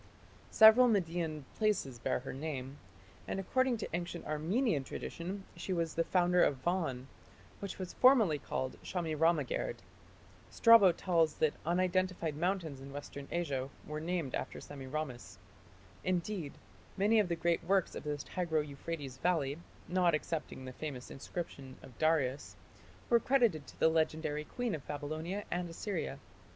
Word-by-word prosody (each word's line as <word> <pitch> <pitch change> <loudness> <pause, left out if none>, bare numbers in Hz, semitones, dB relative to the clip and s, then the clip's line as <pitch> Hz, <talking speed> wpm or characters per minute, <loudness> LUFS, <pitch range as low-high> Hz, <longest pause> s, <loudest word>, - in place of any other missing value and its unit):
Several 220 +3 +8
Median 165 - 0
places 200 - 0
bear 130 +1 -1
her 135 - -6
name, 135 -1 -5 0.5
and - - -2
according 255 +6 +1
to 215 - -5
ancient 175 0 -4
Armenian 160 - 0
tradition 185 +8 -5
she 190 - -3
was 165 -2 -1
the 165 - +1
founder 180 0 +3
of 140 - +2
Van, 160 -8 -1 0.5
which 200 -2 -5
was 185 -2 -5
formerly 225 - +5
called 130 -1 -4
"Shamiramagerd". 165 - 0 0.7
Strabo 230 -5 +7
tells 165 -3 +1
that 155 -2 +2
unidentified 180 -2 +1
mountains 165 -4 -1
in 135 +1 -9
Western 140 0 -7
Asia 140 -6 -2 0.2
were 150 0 -4
named 165 -4 -2
after - - -3
Semiramis. 130 - -6 0.7
Indeed, 180 -3 -1 0.4
many 210 +3 +4
of 205 - +3
the 170 - 0
great 170 +1 +1
works 190 +1 +2
in - - -5
the 150 -1 -2
Tigro 160 0 -1
Euphrates 140 -2 -6
valley, 155 -4 +1 0.3
not 180 -2 +3
excepting 150 -4 -4
the 130 - -7
famous 135 -3 -6
inscription 140 -2 -6
of 125 - -13
Darius, 150 -4 +1 0.5
were 235 - +5
credited 230 - +2
to - - -14
the - - +5
legendary 155 -1 0
queen 245 +3 -3
of 150 -4 -6
Babylonia 155 +7 -4
and 175 0 -1
Assyria. 175 +2 -3
165 Hz, 140 wpm, -33 LUFS, 145-185 Hz, 0.7 s, Several